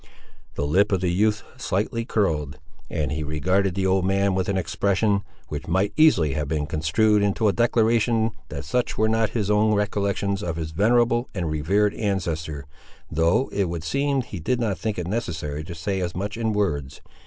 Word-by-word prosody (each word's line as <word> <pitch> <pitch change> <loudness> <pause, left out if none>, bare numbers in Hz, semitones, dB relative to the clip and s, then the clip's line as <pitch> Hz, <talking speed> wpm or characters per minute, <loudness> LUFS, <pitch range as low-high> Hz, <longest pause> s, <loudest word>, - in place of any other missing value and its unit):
The 70 - -1
lip 90 +9 +3
of 95 - +2
the 90 -2 +1
youth 105 +3 +1
slightly 115 0 -1
curled, 75 - 0 0.3
and 75 -3 -2
he 75 +1 -2
regarded 90 +5 0
the 95 -1 0
old 95 0 +2
man 100 +1 +2
with 95 0 -1
an 100 - 0
expression, 100 +4 +1 0.3
which 75 0 -5
might 95 +4 +1
easily 95 - +4
have 75 0 -2
been 75 0 -1
construed 85 +8 +2
into 100 +2 +1
a 100 - +3
declaration 115 -1 +2 0.2
that - - -6
such 125 - -1
were 110 - +3
not 110 -1 +1
his 105 -2 0
own 105 +1 +3
recollections 100 -1 -1
of 85 -5 -3
his 80 -1 -4
venerable 120 +6 +2
and 85 -5 -2
revered 100 +7 +1
ancestor, 80 -8 -2 0.5
though 85 - +2
it 100 - +1
would 85 -2 -4
seem 140 - 0
he 100 -6 -7
did 120 +10 0
not 105 -7 -1
think 110 +1 -2
it 90 - -3
necessary 80 -8 -3
to 85 0 -7
say 95 +4 -2
as 85 -1 -3
much 100 +3 -3
in 115 -1 -1
words. 80 -11 -2
100 Hz, 190 wpm, -24 LUFS, 80-110 Hz, 0.5 s, easily